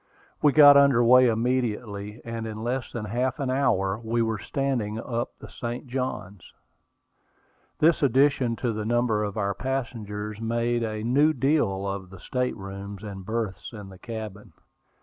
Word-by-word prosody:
We 150 - +5
got 145 0 +9
under 140 -4 +5
way 125 +2 +7
immediately, 110 -3 -1
and 115 -1 -4
in 110 0 -6
less 125 +2 -2
than 115 -3 -4
half 120 +4 -1
an 135 -2 -1
hour 100 -7 +1
we 115 +1 +1
were 110 -2 -1
standing 120 -6 -2
up 120 0 -4
the - - -11
St. 120 +3 -6
Johns. 120 -7 -5 1.2
This 165 +2 +3
addition 135 -2 +3
to 120 -1 -2
the 110 0 -3
number 115 -1 +1
of 100 -1 -4
our 100 -1 0
passengers 105 -4 -4
made 120 +1 0
"a 110 -1 -3
new 145 +7 +3
deal" 120 -8 +1
of 95 -1 -4
the 95 -1 -12
state 125 +4 -2
rooms 100 +1 -8
and 100 -2 -7
berths 110 -2 -3
in 105 -3 -9
the 95 -1 -13
cabin. 110 -4 -7
115 Hz, 160 wpm, -26 LUFS, 105-125 Hz, 1.2 s, got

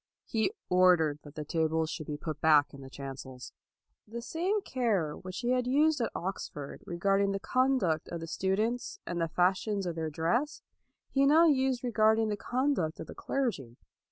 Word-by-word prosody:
He 225 - 0 0.2
ordered 180 -5 +4
that 145 -1 -14
the 150 - -5
tables 160 0 0
should 155 -3 -6
be 150 - -4
put 155 0 -6
back 150 -2 +4
in 140 - -10
the 135 - -10
chancels. 130 -2 -8 0.5
The 235 +2 -7
same 380 - -1
care 205 - 0
which 185 +2 -7
he 245 0 0
had 250 -1 +1
used 295 +2 +3
at 230 - 0
Oxford 150 -6 -5
regarding 195 +3 +1
the 195 - -2
conduct 255 - +1
of 170 - -4
the 165 - -6
students, 220 - -1
and 175 -1 -3
the 165 - +1
fashions 190 +4 +1
of 175 - -2
their 160 -1 -3
dress, 225 - -1 0.5
he 275 0 +3
now 320 +4 +6
used 265 -5 +2
regarding 220 -2 +3
the 210 - 0
con 255 +7 0
duct 160 - -2
of - - -5
the - - -9
clergy. 180 - -3
190 Hz, 185 wpm, -30 LUFS, 160-250 Hz, 0.5 s, now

